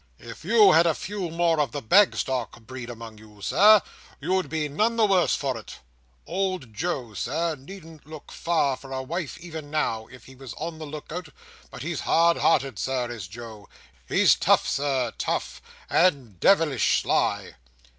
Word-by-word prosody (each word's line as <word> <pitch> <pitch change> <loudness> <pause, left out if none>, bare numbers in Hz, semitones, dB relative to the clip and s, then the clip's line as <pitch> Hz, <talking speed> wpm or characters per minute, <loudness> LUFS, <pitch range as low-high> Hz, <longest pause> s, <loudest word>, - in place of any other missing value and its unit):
If - - -11
you 425 -3 +6
had 170 +1 +5
a 160 - +2
few 195 -3 -5
more 165 -1 +1
of 140 -5 0
the - - -4
Bagstock 130 - +2
breed 125 +1 -8
among 115 -2 -9
you, 105 -1 -17
Sir, 210 0 +6 0.4
you'd 185 0 -1
be 155 -2 -1
none 215 +11 0
the 225 -2 +4
worse 190 -3 +3
for 135 -3 -2
it. 110 - -11 0.5
Old 185 - -3
Joe, 125 - -3
Sir, 155 - -2
needn't 160 +1 -13
look 155 -1 -11
far 155 -5 0
for 135 - -13
a 130 0 -3
wife 165 +2 -4
even 160 -4 -8
now, 115 -8 -1
if 130 -2 -15
he 130 - -14
was 130 -2 -10
on 160 0 -6
the 155 - -7
look 150 0 -9
out; 175 -1 -6 0.4
but - - -9
he's - - -3
hard 170 +1 +3
hearted, 135 -7 +1
Sir, 125 -2 -2
is 110 -7 -7
Joe—he's 100 - -1
tough, - - +2
Sir, 135 -4 -1
tough, - - -3 0.3
and 135 - +1
de 195 - +6
vilish 150 -9 +1
sly!" - - 0
145 Hz, 175 wpm, -25 LUFS, 120-170 Hz, 0.5 s, you